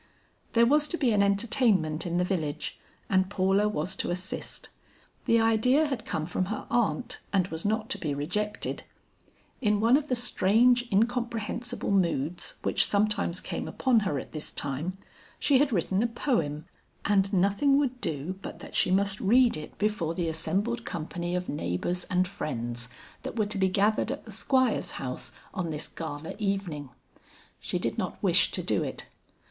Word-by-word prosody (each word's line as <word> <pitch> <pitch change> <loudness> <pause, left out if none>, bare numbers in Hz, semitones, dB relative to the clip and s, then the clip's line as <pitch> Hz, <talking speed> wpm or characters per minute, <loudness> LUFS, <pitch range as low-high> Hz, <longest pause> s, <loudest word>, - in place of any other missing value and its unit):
There 235 0 +6
was 295 +4 +4
to 340 - 0
be 260 -7 +2
an 205 -2 +3
entertainment 200 - +2
in 175 0 -1
the 180 - +3
village 165 -5 -2 0.3
and 190 -1 +2
Paula 195 +1 +2
was 185 -1 -2
to - - -2
assist. 180 +1 -4 0.6
The 230 - +4
idea 225 +7 +4
had 265 -7 -3
come 155 - -2
from 180 +2 -1
her 210 +3 -4
aunt 240 +1 0
and 190 -3 +3
was 160 +3 -5
not 215 +1 0
to 205 - -2
be 150 -5 -2
rejected. 205 +9 -2 0.8
In 210 -3 +2
one 230 +4 +5
of 295 +1 +1
the 255 - +1
strange 240 +1 +3
incomprehensible 235 +1 -1
moods 170 -3 0
which - - +3
sometimes 205 -3 +1
came - - -4
upon 255 -4 +2
her 190 -9 -1
at - - -6
this 155 -1 -4
time, 145 +7 -3 0.4
she 285 -3 +4
had 285 -1 +3
written 190 0 +1
a 240 - +2
poem, 230 - -1 0.4
and 195 -1 +3
nothing 200 +9 +3
would 260 -3 0
do 165 +5 -3
but - - -7
that - - -11
she - - +4
mast 195 +2 +3
read 240 +4 +5
it 155 0 -8
before 195 -6 0
the 170 -1 -1
assembled 195 +9 -1
company 175 +2 -4
of 180 0 -2
neighbors 145 - -2
and 180 0 +1
friends, 120 -8 -4 0.3
that - - -6
were 215 - +2
to 205 0 -4
be 190 0 +3
gathered 210 +4 +2
at 280 - -6
the 220 - -9
Squire's 255 +3 +1
house 125 -2 -4 0.2
on 175 -3 -2
this 150 -1 -2
gala 160 -1 -6
evening. 195 -9 -2 0.7
She - - -3
did - - -2
not - - -3
wish - - +4
to - - -3
do - - +1
it. - - -4
200 Hz, 175 wpm, -28 LUFS, 170-230 Hz, 0.8 s, There